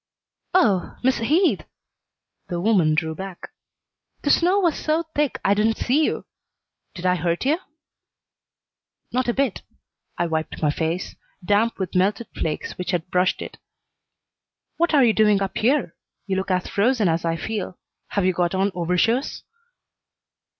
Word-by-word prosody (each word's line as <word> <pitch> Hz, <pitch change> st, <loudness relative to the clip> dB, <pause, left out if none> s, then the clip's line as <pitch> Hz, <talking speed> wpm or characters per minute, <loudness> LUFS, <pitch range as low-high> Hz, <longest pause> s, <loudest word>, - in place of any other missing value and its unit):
"Oh, 200 Hz, -, +2 dB
Miss 260 Hz, +1 st, +2 dB
Heath!" 315 Hz, -, +2 dB, 0.8 s
The 175 Hz, -2 st, -3 dB
woman 175 Hz, -6 st, +3 dB
drew 160 Hz, 0 st, -1 dB
back. 190 Hz, +1 st, -8 dB, 0.7 s
"The 290 Hz, -, +3 dB
snow 360 Hz, +4 st, +4 dB
was 345 Hz, -6 st, +2 dB
so 315 Hz, +2 st, 0 dB
thick 295 Hz, -2 st, 0 dB
I 200 Hz, -, +5 dB
didn't 215 Hz, +2 st, +1 dB
see 285 Hz, +6 st, +2 dB
you. -, -, -1 dB, 0.7 s
Did 180 Hz, -, -7 dB
I 180 Hz, -, +4 dB
hurt 175 Hz, +3 st, -1 dB
you?" 305 Hz, +5 st, +2 dB, 1.5 s
"Not 255 Hz, 0 st, 0 dB
a 240 Hz, -, +2 dB
bit." 275 Hz, -6 st, 0 dB, 0.6 s
I 175 Hz, -, +1 dB
wiped 160 Hz, -1 st, -3 dB
my 150 Hz, -2 st, +2 dB
face, 165 Hz, +4 st, -3 dB, 0.3 s
damp 210 Hz, +4 st, +2 dB
with 190 Hz, -2 st, -4 dB
melted 200 Hz, +5 st, +1 dB
flakes 155 Hz, +2 st, -3 dB
which 180 Hz, -, -4 dB
had 175 Hz, -1 st, -2 dB
brushed 180 Hz, +1 st, +1 dB
it. -, -, -10 dB, 1.2 s
"What 340 Hz, -1 st, +2 dB
are 275 Hz, -3 st, +6 dB
you 225 Hz, -, +4 dB
doing 210 Hz, -2 st, +4 dB
up 195 Hz, -1 st, -3 dB
here? 245 Hz, -, +1 dB, 0.3 s
You 195 Hz, -1 st, -1 dB
look 190 Hz, +1 st, -2 dB
as 185 Hz, -1 st, +1 dB
frozen 220 Hz, 0 st, +2 dB
as 165 Hz, 0 st, 0 dB
I 165 Hz, -1 st, 0 dB
feel. 195 Hz, +1 st, -4 dB, 0.3 s
Have 200 Hz, -3 st, -1 dB
you 185 Hz, -, +3 dB
got 175 Hz, +1 st, 0 dB
on 195 Hz, +2 st, +1 dB
overshoes?" 180 Hz, -, 0 dB
195 Hz, 155 wpm, -23 LUFS, 175-245 Hz, 1.5 s, are